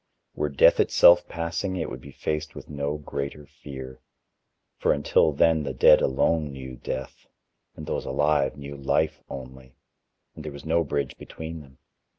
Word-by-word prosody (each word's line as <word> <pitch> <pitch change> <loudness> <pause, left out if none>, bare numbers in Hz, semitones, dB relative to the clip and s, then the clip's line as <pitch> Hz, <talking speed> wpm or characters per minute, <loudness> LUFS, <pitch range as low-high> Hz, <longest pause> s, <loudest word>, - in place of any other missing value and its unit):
Were 75 - -1
Death 70 - +5
itself 85 0 +6
passing, 85 +3 -3
it 80 -4 -2
would 65 - -7
be 70 - -12
faced 75 +2 -4
with - - -10
no 70 +1 -2
greater 70 0 -5
fear: 65 -2 -10 0.8
for - - +3
until 75 +2 +3
then 80 +2 +3
the 70 - -4
dead - - +7
alone 75 +3 +1
knew 65 -1 -8
Death, 65 +2 -6 0.5
and - - -8
those - - -3
alive 75 0 +1
knew 70 0 -8
Life 75 +3 0
only 65 -1 -10 0.6
and 80 - -9
there 75 - -6
was 70 +1 -11
no 85 +1 +2
bridge 70 -3 -2
between 80 0 -8
them. 65 -3 -16
70 Hz, 160 wpm, -25 LUFS, 65-80 Hz, 0.8 s, dead